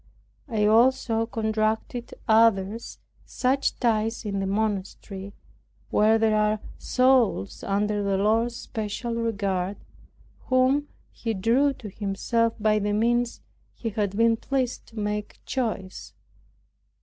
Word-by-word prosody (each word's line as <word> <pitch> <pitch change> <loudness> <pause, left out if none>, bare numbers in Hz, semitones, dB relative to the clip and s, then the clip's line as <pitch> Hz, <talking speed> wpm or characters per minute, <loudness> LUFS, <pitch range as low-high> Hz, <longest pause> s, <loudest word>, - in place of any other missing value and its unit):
I 215 -3 +1
also 225 0 +3
contracted 220 +1 -2
other 220 -2 +4 0.4
such 265 +2 0
ties 225 -1 0
in 200 -1 -2
this 195 0 -1
monastery, 200 -1 -3 0.6
where 215 +1 +4
there 220 -1 +2
are 210 0 +2 0.2
souls 255 - +2
under 205 +1 0
the 200 -1 0
Lord's 225 +4 +2
special 225 +2 -4
regard, 200 -4 -1 0.7
whom 260 +3 +3 0.2
He 225 -2 -3
drew 245 +9 +2
to 255 -4 -10
Himself 225 +3 0
by 215 0 +3
the 205 0 -1
means 235 +2 +1 0.3
He 230 - -4
had 205 -1 -2
been 230 0 +4
pleased 260 0 -2
to 230 - -16
make 210 0 -3
choice. 220 -7 -3
220 Hz, 115 wpm, -25 LUFS, 205-235 Hz, 0.7 s, other